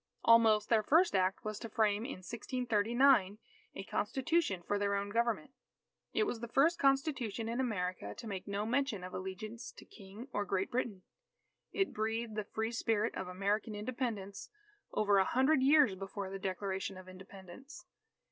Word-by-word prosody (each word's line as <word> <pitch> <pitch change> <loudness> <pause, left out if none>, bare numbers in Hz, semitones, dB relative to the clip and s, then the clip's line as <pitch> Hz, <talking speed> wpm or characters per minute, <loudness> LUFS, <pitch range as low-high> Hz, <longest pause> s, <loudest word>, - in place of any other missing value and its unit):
Almost, 225 -2 +5
their 225 -2 +4
first 325 - +3
act 190 +2 +1
was 215 -1 -4
to 230 - -7
frame 215 0 +1
in 215 -9 -7
1639, 235 -1 +2 0.4
a - - -5
Constitution 260 - 0
for 205 - 0
their 200 0 +1
own 200 0 -2
government. 235 +5 0 0.6
It - - +2
was 245 - -2
the 235 - -5
first 290 +9 +3
Constitution 270 -5 +1
in 235 +2 -2
America 185 -8 -2
to 245 - -9
make 195 -2 -5
no 200 +1 -2
mention 245 -4 0
of 185 - -8
allegiance 190 +5 -6
to - - -14
King 205 +4 -11
or 205 - 0
Great 195 -1 -1
Britain. 225 -6 -2 0.7
It 390 -1 0
breathed 225 +1 -2
the 215 0 -2
free 220 +2 -3
spirit 225 -2 0
of 190 - -5
American 200 +4 -1
Independence 210 -3 -4 0.4
over 205 -2 +3
a - - +5
hundred 265 +7 +3
years 280 -5 +5
before 195 0 -6
the 195 - -5
Declaration 190 0 -3
of 185 0 -11
Independence. 190 +7 -12
215 Hz, 165 wpm, -33 LUFS, 195-245 Hz, 0.7 s, Almost